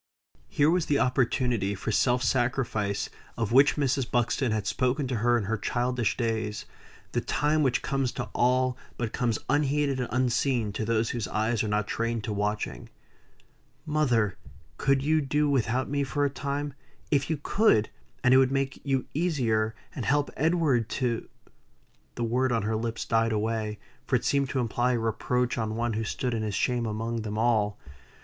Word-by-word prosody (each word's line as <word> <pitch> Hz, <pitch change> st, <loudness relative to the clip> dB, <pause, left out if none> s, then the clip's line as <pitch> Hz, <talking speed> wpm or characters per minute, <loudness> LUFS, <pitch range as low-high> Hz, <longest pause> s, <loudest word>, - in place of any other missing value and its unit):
Here 150 Hz, +2 st, +3 dB
was 175 Hz, -1 st, +1 dB
the 145 Hz, -, +2 dB
opportunity 125 Hz, -5 st, +1 dB
for 100 Hz, -, -3 dB
self 125 Hz, +3 st, +2 dB
sacrifice 120 Hz, -6 st, 0 dB, 0.3 s
of 115 Hz, -2 st, -1 dB
which 135 Hz, +4 st, +6 dB
Mrs. 135 Hz, -3 st, 0 dB
Buxton 120 Hz, +1 st, +1 dB
had 110 Hz, -2 st, -1 dB
spoken 130 Hz, +5 st, 0 dB
to 125 Hz, -2 st, -1 dB
her 120 Hz, +2 st, +3 dB
in 115 Hz, -, -1 dB
her 110 Hz, +2 st, -2 dB
childish 120 Hz, +3 st, 0 dB
days 110 Hz, -3 st, -2 dB, 0.5 s
the -, -, 0 dB
time 150 Hz, +1 st, +1 dB
which 130 Hz, -4 st, +1 dB
comes 135 Hz, -2 st, 0 dB
to -, -, -3 dB
all, 125 Hz, +1 st, +2 dB, 0.2 s
but 115 Hz, -3 st, -3 dB
comes 120 Hz, -4 st, 0 dB
unheeded 145 Hz, -1 st, +1 dB
and 125 Hz, -, -2 dB
unseen 125 Hz, -3 st, +1 dB
to 110 Hz, -, -2 dB
those 115 Hz, 0 st, +1 dB
whose 115 Hz, -5 st, -3 dB
eyes 110 Hz, +1 st, 0 dB
are -, -, -1 dB
not 105 Hz, 0 st, 0 dB
trained 115 Hz, +1 st, -2 dB
to 110 Hz, -, -3 dB
watching. 105 Hz, +1 st, -3 dB, 1.0 s
"Mother! 120 Hz, -, +1 dB, 0.4 s
could 135 Hz, 0 st, +2 dB
you 155 Hz, +1 st, +3 dB
do 150 Hz, +2 st, +1 dB
without 130 Hz, -2 st, +1 dB
me 140 Hz, 0 st, 0 dB
for 145 Hz, +2 st, 0 dB
a 140 Hz, -, 0 dB
time? 140 Hz, +1 st, -3 dB, 0.4 s
If 140 Hz, -1 st, +2 dB
you 160 Hz, -, 0 dB
could, 150 Hz, -, +3 dB, 0.3 s
and 125 Hz, -, +5 dB
it -, -, +8 dB
would 130 Hz, 0 st, +4 dB
make 135 Hz, 0 st, -1 dB
you 135 Hz, -2 st, 0 dB
easier, 120 Hz, -10 st, 0 dB, 0.2 s
and 130 Hz, -, -4 dB
help 145 Hz, +6 st, +1 dB
Edward 150 Hz, -7 st, +2 dB
to" 120 Hz, -3 st, -1 dB, 0.9 s
The 120 Hz, -, -2 dB
word 125 Hz, +3 st, +1 dB
on 115 Hz, -3 st, +1 dB
her 110 Hz, +1 st, 0 dB
lips 115 Hz, +1 st, -3 dB
died 115 Hz, 0 st, +2 dB
away; 110 Hz, 0 st, -1 dB, 0.3 s
for -, -, +2 dB
it -, -, 0 dB
seemed 140 Hz, -2 st, +1 dB
to 135 Hz, -, -1 dB
imply 120 Hz, +1 st, +1 dB
a -, -, +1 dB
reproach 120 Hz, +2 st, 0 dB
on 110 Hz, -1 st, -2 dB
one 120 Hz, 0 st, -1 dB
who 110 Hz, +1 st, -1 dB
stood 125 Hz, +3 st, -2 dB
in 115 Hz, -, -1 dB
his 105 Hz, -2 st, -2 dB
shame 120 Hz, +1 st, 0 dB
among 115 Hz, +2 st, -2 dB
them 105 Hz, -1 st, -4 dB
all. 110 Hz, -3 st, +2 dB
120 Hz, 180 wpm, -27 LUFS, 110-135 Hz, 1.0 s, it